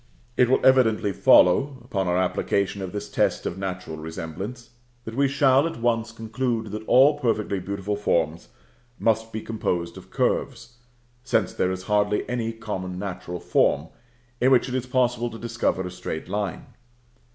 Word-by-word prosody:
It 125 - +4
will 130 - +2
evidently 110 -6 +4
follow, 130 +12 +5
upon 95 -2 -2
our 90 0 +1
application 100 +2 0
of 95 -2 -5
this 105 0 -5
test 100 - 0
of 90 - -3
natural 90 -4 -5
resemblance, 80 +10 -7 0.3
that 110 - -6
we 140 +3 +2
shall 135 +1 +3
at 165 - -6
once 115 -1 0
conclude 115 0 -3
that 110 +1 -5
all 145 +3 +5
perfectly 105 -6 0
beautiful 100 +2 -3
forms 85 -5 0 0.5
must 115 0 +1
be 110 - -4
composed 90 -6 -2
of - - -12
curves; 120 - -2 0.5
since 110 -6 +1
there 90 - 0
is 95 0 -4
hardly 105 +1 +1
any 120 -2 -2
common 95 -5 -5
natural 90 -2 -5
form 75 0 +1 0.5
in 130 - +4
which 130 -1 +4
it 125 - -5
is 130 -1 -2
possible 125 -1 +1
to 115 - -9
discover 115 -5 -1
a 90 - -5
straight 80 -3 -6
line. 100 -3 -3
105 Hz, 165 wpm, -24 LUFS, 95-120 Hz, 0.5 s, follow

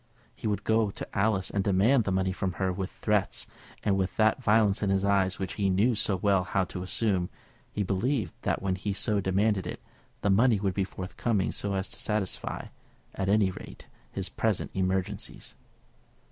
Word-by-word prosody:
He - - -4
would 105 -1 -1
go 110 -1 +2
to - - -6
Alice 100 -2 +1
and 100 - 0
demand 105 +6 +3
the 95 - 0
money 95 0 +1
from 95 0 -2
her 95 0 -1
with 95 0 -3
threats, 105 -2 0 0.4
and 100 - +2
with 95 -1 -1
that 110 +3 +3
violence 105 -3 +3
in 100 - +1
his 95 0 +2
eyes 95 -2 +2
which 95 - -3
he 100 - +3
knew 105 +7 +3
so 105 -2 +1
well 95 0 +2
how 95 +2 0
to 90 - -4
assume. 95 -1 0 0.4
He 105 - -1
believed 100 - 0
that - - -1
when 95 -1 +1
he 100 +2 -2
so 100 +1 0
demanded 95 +1 +1
it, - - -5 0.4
the 100 - +2
money 110 +2 +4
would 95 -2 0
be 95 0 0
forthcoming 95 +2 -1
so 100 -1 -2
as 95 0 -1
to - - -5
satisfy, 105 -3 -2 0.4
at 95 0 -2
any 100 -2 +4
rate, - - -10 0.3
his - - -2
present - - -1
emergencies. 95 -1 -2
100 Hz, 190 wpm, -28 LUFS, 95-105 Hz, 0.4 s, money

